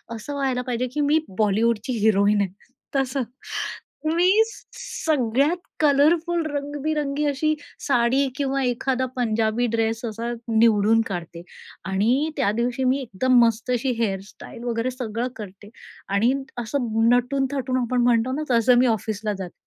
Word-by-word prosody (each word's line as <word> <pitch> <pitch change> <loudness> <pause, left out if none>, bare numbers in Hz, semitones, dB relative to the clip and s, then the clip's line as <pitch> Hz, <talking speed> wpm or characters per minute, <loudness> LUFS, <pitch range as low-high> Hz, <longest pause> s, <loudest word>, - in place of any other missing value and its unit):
असं 255 +6 -7
व्हायला 265 -3 -1
पाहिजे, 250 0 -2
की 300 - -1
मी 295 +2 +3 0.2
बॉलिवूडची 220 +3 +1
हिरोईन 205 -1 +3
आहे 190 -2 -2 0.4
तसं. 270 0 0 0.9
मी 370 +5 +5 0.4
सगळ्यात 290 - 0 0.2
कलरफुल, 315 +4 +3
रंगबिरंगी 290 0 -2
अशी 300 +2 +1 0.3
साडी 255 +1 +3
किंवा 275 -1 -1
एखादा 255 +1 0
पंजाबी 225 0 +1
ड्रेस 225 +1 -1
असा 230 +1 -4 0.3
निवडून 225 0 +4
काढते 170 -3 -6 0.5
आणि 240 +11 +2
त्या 250 -7 +2
दिवशी 240 +4 -1
मी 260 +2 +2
एकदम 250 +2 +2
मस्त 230 +1 0
अशी 250 +1 0
हेअरस्टाईल 205 +2 -4
वगैरे 240 +1 -1
सगळं 240 -1 -3
करते. 205 0 -10 0.4
आणि 210 +6 +2 0.3
असं 240 +2 -2 0.2
नटून-थटून, 260 +1 +1
आपण 245 +1 0
म्हणतो 240 +1 +2
ना 300 +3 -2
तसं, 240 +1 +4
मी 255 - +4
ऑफिसला 215 -1 -1
जाते. 180 -2 -6
245 Hz, 130 wpm, -23 LUFS, 220-275 Hz, 0.9 s, मी